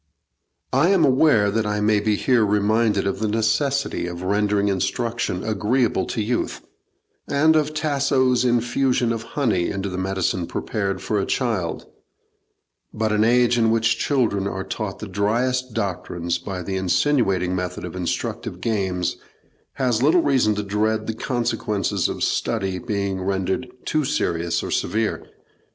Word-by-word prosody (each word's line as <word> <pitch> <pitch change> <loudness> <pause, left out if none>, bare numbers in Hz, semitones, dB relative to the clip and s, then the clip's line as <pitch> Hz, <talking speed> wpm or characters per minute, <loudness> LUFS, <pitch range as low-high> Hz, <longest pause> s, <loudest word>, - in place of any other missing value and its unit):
I 140 +7 +4
am 190 -5 +4
aware 130 -7 +3
I 105 0 -1
may 105 0 +3
be 105 0 +1
here 125 +1 +2
reminded 105 0 +2
of 100 0 -1
the 110 - 0
necessity 115 +2 0
of 90 0 -6
rendering 100 +1 +1
instruction 100 +1 -1
agreeable 110 0 0
to 110 - -2
youth, 120 +3 -2 0.7
and 155 +3 +3
of 155 0 +1
Tasso's 140 -4 +2
infusion 120 0 +1
of 115 - -4 0.2
honey 110 -11 +1
into 100 0 -3
the 90 0 -4
medicine 95 -2 -1
prepared 100 -3 -3
for 105 - 0
a 95 - 0
child; 110 -10 -1 1.1
but 110 0 -1
an 105 0 +3
age 120 +1 +3
in 115 -1 +3
which 115 +1 +2
children 110 -9 +1
are 95 -1 -3
taught 105 -2 -4
the 110 - -7
driest 120 +5 0
doctrines 85 -4 -2
by 90 0 -5
the 95 +2 -3
insinuating 95 -2 +1
method 90 -1 -4
of 90 - -7
instructive 90 -2 -3
games, 95 -6 -1 0.6
has 125 -4 0
little 160 +6 +4
reason 130 -7 +2
to 105 - -2
dread 110 +2 0
the 110 - -2
consequences 115 -5 -1
of - - -3
study 95 -1 -1
being 100 -5 -2
rendered 95 +5 -1 0.2
too 155 -1 +1
serious 85 - -1
or - - -4
severe. 110 +4 -1
110 Hz, 145 wpm, -22 LUFS, 95-125 Hz, 1.1 s, I